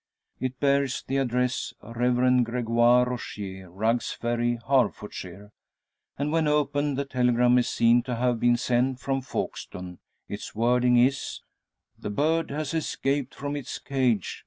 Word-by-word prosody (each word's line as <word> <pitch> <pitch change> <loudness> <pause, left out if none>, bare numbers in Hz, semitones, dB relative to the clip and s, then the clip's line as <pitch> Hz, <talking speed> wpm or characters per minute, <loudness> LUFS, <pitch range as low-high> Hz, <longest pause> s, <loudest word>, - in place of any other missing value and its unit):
It 130 0 -3
bears 140 -2 +1
the 135 - -1
address 125 -1 -1
"Rev. 125 +2 +2
Gregoire 120 +1 +3
Rogier, 100 -6 -6
Rugg's 110 +6 0
Ferry, 120 0 -1
Herefordshire," 105 -7 -1 0.7
and 145 +2 -1
when 160 -1 +2
opened 145 -1 +1
the 140 - -1
telegram 125 -1 +3
is 120 - 0
seen 120 +1 +4
to 125 - -2
have 120 0 0
been 120 0 +3
sent 125 +1 0
from 135 +1 -1
Folkestone. 90 -7 -6 0.3
Its 105 - -7
wording 125 +2 +3
is: 135 +3 +1 0.6
"_The 105 - -4
bird 160 +4 +1
has 150 +1 -3
escaped 140 -4 -1
from 145 +1 -4
its 140 -4 -5
cage. 125 -8 -1
125 Hz, 135 wpm, -26 LUFS, 120-135 Hz, 0.7 s, seen